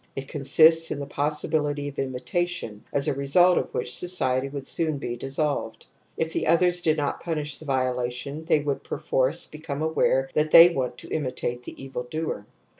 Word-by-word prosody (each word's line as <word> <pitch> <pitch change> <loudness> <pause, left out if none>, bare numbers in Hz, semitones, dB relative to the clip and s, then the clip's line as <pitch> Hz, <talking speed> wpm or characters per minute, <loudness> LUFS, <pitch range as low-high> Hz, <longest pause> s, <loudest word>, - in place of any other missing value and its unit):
It 135 0 -6
con 145 -1 -6
sists 160 +4 +5
in - - -4
the 140 - -4
possibility 145 0 -1
of 140 - -7
imitation, 130 -3 -3
as 140 0 0
a - - +1
result 160 +7 +4
of - - -5
which 125 - -3
society 135 -7 0
would 140 -1 -7
soon 155 -1 +1
be 120 -3 -4
dissolved. 135 -3 -3 0.3
If 160 0 -2
the - - -1
others 175 +2 +3
did 160 -2 +2
not 145 -1 -2
pimish 150 -4 -3
the 155 - -11
violation 130 +2 -2
they 160 -2 +2
would 145 -1 -3
perforce 145 +1 0
become 155 -1 -6
aware 135 -4 +1
that 150 +1 +1
they 165 +2 +9
want 130 -6 -3
to - - -10
imitate 125 -4 -3
the - - -10
evil 130 -2 -6
doer. 155 -9 -4
145 Hz, 185 wpm, -25 LUFS, 130-160 Hz, 0.3 s, they